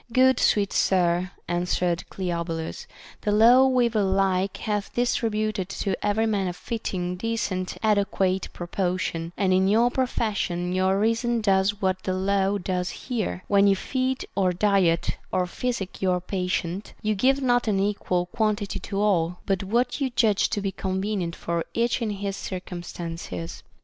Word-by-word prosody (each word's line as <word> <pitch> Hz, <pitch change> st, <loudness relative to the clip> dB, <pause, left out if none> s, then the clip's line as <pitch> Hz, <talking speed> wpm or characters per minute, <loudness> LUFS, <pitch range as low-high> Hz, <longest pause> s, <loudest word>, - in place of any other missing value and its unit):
Good 260 Hz, +1 st, +4 dB
sweet 200 Hz, -2 st, +2 dB
sir, 180 Hz, -1 st, +2 dB, 0.2 s
answered 175 Hz, 0 st, -1 dB
Cleobulus, 170 Hz, -3 st, -4 dB, 0.3 s
the 210 Hz, -, 0 dB
law 240 Hz, +5 st, +7 dB
weaver 240 Hz, -4 st, +2 dB
like 190 Hz, 0 st, +1 dB
hath 210 Hz, -2 st, -2 dB
distributed 215 Hz, -5 st, 0 dB
to 195 Hz, -1 st, -2 dB
every 210 Hz, +2 st, +2 dB
man 205 Hz, -4 st, 0 dB
a 180 Hz, -, -2 dB
fitting, 180 Hz, -3 st, -4 dB
decent, 195 Hz, -4 st, -2 dB
adequate 195 Hz, -3 st, +1 dB
portion, 175 Hz, -2 st, -2 dB
and 190 Hz, -2 st, +2 dB
in 190 Hz, +1 st, +3 dB
your 230 Hz, +4 st, +4 dB
profession 200 Hz, -9 st, -1 dB
your 190 Hz, +1 st, +2 dB
reason 230 Hz, +2 st, +1 dB
does 200 Hz, -1 st, +1 dB
what 185 Hz, 0 st, +1 dB
the 185 Hz, -, -2 dB
law 195 Hz, +1 st, +1 dB
does 180 Hz, -1 st, -2 dB
here, 220 Hz, -7 st, -4 dB
— -, -, -34 dB
when 200 Hz, 0 st, +4 dB
you 195 Hz, -, +5 dB
feed, 260 Hz, +5 st, -2 dB
or 190 Hz, -2 st, +2 dB
diet, 180 Hz, -3 st, +2 dB
or 180 Hz, -, +1 dB
physic 200 Hz, 0 st, -4 dB
your 185 Hz, -2 st, +2 dB
patient, 180 Hz, 0 st, -3 dB
you 215 Hz, 0 st, +1 dB
give 260 Hz, +7 st, +3 dB
not 245 Hz, -3 st, +2 dB
an 200 Hz, -3 st, +2 dB
equal 195 Hz, -3 st, 0 dB
quantity 210 Hz, 0 st, -1 dB
to 200 Hz, -1 st, -4 dB
all, 180 Hz, -4 st, +2 dB
but 195 Hz, -1 st, 0 dB
what 240 Hz, +8 st, 0 dB
you 270 Hz, -, +1 dB
judge 225 Hz, -4 st, +2 dB
to 205 Hz, -, -1 dB
be 195 Hz, -1 st, -1 dB
con 190 Hz, 0 st, -3 dB
venient 190 Hz, -4 st, -2 dB
for 170 Hz, -1 st, -2 dB
each 235 Hz, +1 st, +1 dB
in 225 Hz, -, 0 dB
his 200 Hz, -1 st, -3 dB
circumstances. 170 Hz, -, -6 dB
195 Hz, 155 wpm, -25 LUFS, 180-215 Hz, 0.3 s, law